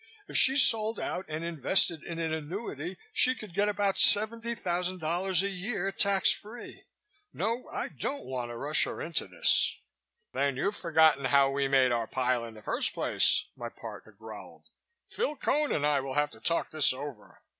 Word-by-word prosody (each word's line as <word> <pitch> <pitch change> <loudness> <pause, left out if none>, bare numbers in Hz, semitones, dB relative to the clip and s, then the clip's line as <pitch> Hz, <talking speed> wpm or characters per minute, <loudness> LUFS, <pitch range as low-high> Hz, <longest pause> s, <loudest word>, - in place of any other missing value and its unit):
If - - -10
she 265 - +5
sold 225 -5 +3
out 185 - -4
and 155 +1 -5
invested 170 +1 0
in 170 - -7
an 165 -1 -2
annuity 160 - -6 0.2
she 255 0 +4
could 210 -7 -11
get 205 +3 +1
about 200 -1 -1
$70,000 190 -5 +3
a - - 0
year, 195 0 -3
tax 195 0 +3
free. 230 +3 -9 0.5
No, 230 +4 -3
I - - -4
don't 280 - -5
want 125 -2 -5
to 120 - -7
rush 145 +5 +2
her - - -7
into 165 -9 -3
this." 90 -2 +2 0.6
"Then 140 0 -1
you've 200 +9 -1
forgotten 160 -5 +2
how 135 +1 +3
we 140 0 -1
made 135 -2 +3
our 115 -2 -1
pile 125 -2 -1
in 115 -1 -10
the 105 - -14
first 240 +5 0
place," - - +2
my - - -7
partner - - -11
growled. - - -13 0.4
"Phil 460 -10 -3
Cone 295 +1 -1
and 145 - -1
I 145 -1 +2
will 135 0 -6
have 150 0 0
to 110 - -16
talk 170 +8 -1
this 155 -3 +3
over. 135 -5 -10
170 Hz, 175 wpm, -28 LUFS, 140-205 Hz, 0.6 s, she